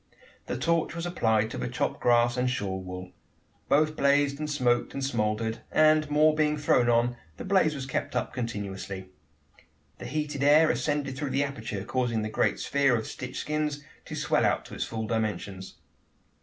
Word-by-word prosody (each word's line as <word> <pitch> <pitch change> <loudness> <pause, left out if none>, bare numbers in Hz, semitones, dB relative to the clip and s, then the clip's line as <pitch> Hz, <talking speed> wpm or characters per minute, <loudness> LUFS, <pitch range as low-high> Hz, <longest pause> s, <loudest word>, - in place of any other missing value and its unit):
The - - -2
torch 165 +4 0
was 170 0 -4
applied 110 -10 +1
to - - -5
the 65 - -2
chopped - - -2
grass 120 0 +3
and 125 0 +1
shawl 100 -6 -2
wool. 90 0 -8 0.6
Both 155 +1 +3
blazed 140 0 +2
and 155 0 -3
smoked, 125 -5 +1
and 135 -1 -2
smouldered; 110 -3 -1
and, 155 -1 +4
more 155 +1 +4
being 150 0 +1
thrown 125 -5 +3
on, 120 +1 +2 0.2
the - - -7
blaze 185 -5 +3
was 135 -2 -5
kept 135 - -3
up - - -1
continuously. 100 -5 -5 0.9
The - - -7
heated 150 0 -3
air 150 +3 +6
ascended 145 -3 -1
through 145 0 -3
the 135 +2 +1
aperture, 110 -8 -4
causing 120 -2 -1
the 110 - -3
great - - +1
sphere 140 -3 +2
of 110 - -2
stitched 130 0 -7
skins 150 -1 -2 0.2
to - - -7
swell - - +1
out - - +1
to - - -11
its - - -2
full 110 -1 -4
dimensions. 105 -4 -3
130 Hz, 180 wpm, -28 LUFS, 110-150 Hz, 0.9 s, air